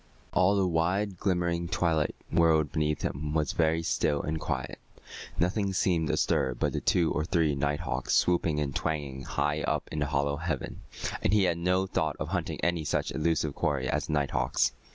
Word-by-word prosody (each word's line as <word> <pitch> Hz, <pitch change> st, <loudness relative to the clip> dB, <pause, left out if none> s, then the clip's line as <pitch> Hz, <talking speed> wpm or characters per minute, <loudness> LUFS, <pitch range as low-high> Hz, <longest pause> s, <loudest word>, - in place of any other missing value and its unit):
All 95 Hz, +2 st, +4 dB
the 100 Hz, -1 st, +2 dB
wide, 90 Hz, +3 st, 0 dB
glimmering 85 Hz, -2 st, 0 dB
twilight 80 Hz, -3 st, +1 dB, 0.2 s
world 80 Hz, -3 st, +3 dB
beneath 75 Hz, -1 st, -1 dB
him 75 Hz, +3 st, -3 dB
was 75 Hz, -4 st, +1 dB
very 80 Hz, 0 st, +1 dB
still 80 Hz, -4 st, +1 dB
and 80 Hz, +1 st, -2 dB
quiet. 70 Hz, -5 st, -3 dB, 0.6 s
Nothing 95 Hz, +3 st, +1 dB
seemed 85 Hz, -4 st, +1 dB
astir 65 Hz, -1 st, +1 dB
but -, -, -1 dB
the -, -, -2 dB
two 85 Hz, -3 st, +2 dB
or 75 Hz, -, 0 dB
three 80 Hz, -2 st, +1 dB
night 70 Hz, +3 st, -1 dB
hawks 85 Hz, -, -1 dB
swooping 85 Hz, -3 st, +2 dB
and 70 Hz, -2 st, -2 dB
twanging 70 Hz, -4 st, -2 dB
high 75 Hz, +3 st, -1 dB
up -, -, -1 dB
in 75 Hz, -, -3 dB
the 75 Hz, -, 0 dB
hollow 70 Hz, 0 st, 0 dB
heaven, 80 Hz, -4 st, -4 dB, 0.4 s
and 95 Hz, -, +1 dB
he 105 Hz, -2 st, +5 dB
had 85 Hz, -2 st, +1 dB
no 90 Hz, +2 st, +2 dB
thought 80 Hz, -5 st, -1 dB
of -, -, -3 dB
hunting -, -, -2 dB
any 85 Hz, -2 st, +1 dB
such -, -, -1 dB
elusive 80 Hz, -2 st, 0 dB
quarry 70 Hz, -4 st, -1 dB
as -, -, -1 dB
the -, -, -2 dB
night 70 Hz, -2 st, +1 dB
hawks. 60 Hz, +1 st, +1 dB
80 Hz, 190 wpm, -29 LUFS, 75-85 Hz, 0.6 s, he